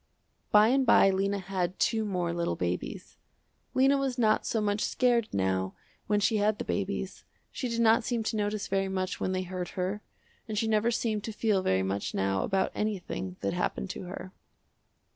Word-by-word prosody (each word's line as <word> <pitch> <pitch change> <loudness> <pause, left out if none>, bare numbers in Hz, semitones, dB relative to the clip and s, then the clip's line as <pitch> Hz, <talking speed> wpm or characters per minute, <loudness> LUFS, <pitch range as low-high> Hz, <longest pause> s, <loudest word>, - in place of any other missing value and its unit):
By 210 +1 +7
and 270 +2 +3
by 195 -6 +6
Lena 195 +1 0
had 185 -1 -2
two 220 -1 +1
more 180 -5 -1
little 170 - -1
babies. 90 0 -4 0.6
Lena 270 +2 +4
was 265 -2 -1
not 215 -3 +2
so 225 - 0
much 205 0 0
scared 240 -3 +2
now 95 -1 0 0.3
when 210 0 +2
she 215 +2 +2
had 210 +1 +2
the - - -5
babies. 195 -1 -3 0.3
She 250 - -3
did 230 0 0
not 230 +1 +5
seem 235 -1 -1
to 220 - -2
notice 210 0 -1
very 195 0 0
much 185 -1 -2
when 185 - -1
they 185 0 -1
hurt 180 -1 -5
her, 190 +3 -1 0.5
and 215 -2 -4
she 225 - +1
never 220 +1 +2
seemed 220 -3 -1
to 225 - -4
feel 210 -2 +1
very 95 - +1
much 95 +1 -2
now 95 0 +1
about 190 - 0
anything 190 -3 -3
that - - -1
happened 180 +1 -2
to - - -7
her. 185 +1 -7
200 Hz, 190 wpm, -29 LUFS, 180-220 Hz, 0.6 s, By